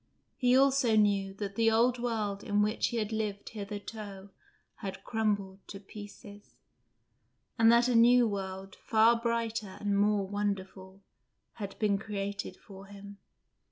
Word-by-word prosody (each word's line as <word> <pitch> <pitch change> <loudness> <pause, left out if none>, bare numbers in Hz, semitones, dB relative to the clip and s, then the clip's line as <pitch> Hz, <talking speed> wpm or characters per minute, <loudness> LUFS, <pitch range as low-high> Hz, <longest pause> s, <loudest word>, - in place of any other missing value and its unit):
He 250 -1 +3
also 270 -4 +3
knew 200 -2 +2
that 200 -1 -5
the 225 +2 +3
old 240 +2 +3
world 215 -4 -2
in 205 0 +1
which 215 +2 0
he 240 - -3
had 215 -1 -2
lived 210 -2 -3
hitherto 205 -1 -8 0.5
had 195 -1 -7
crumbled 205 -4 -1
to 195 - -8
pieces; 205 0 -12 1.0
and 225 0 +7
that 235 +1 +5
a 250 - +1
new 240 +1 +6
world, 195 -1 -5
far 230 +1 +4
brighter 230 -3 -2
and 205 -1 0
more 205 -1 +2
wonderful, 195 -1 -4 0.6
had 200 -1 -6
been 205 -2 +1
created 200 -1 -5
for 195 -1 -13
him. 200 0 -12
205 Hz, 140 wpm, -30 LUFS, 200-225 Hz, 1.0 s, and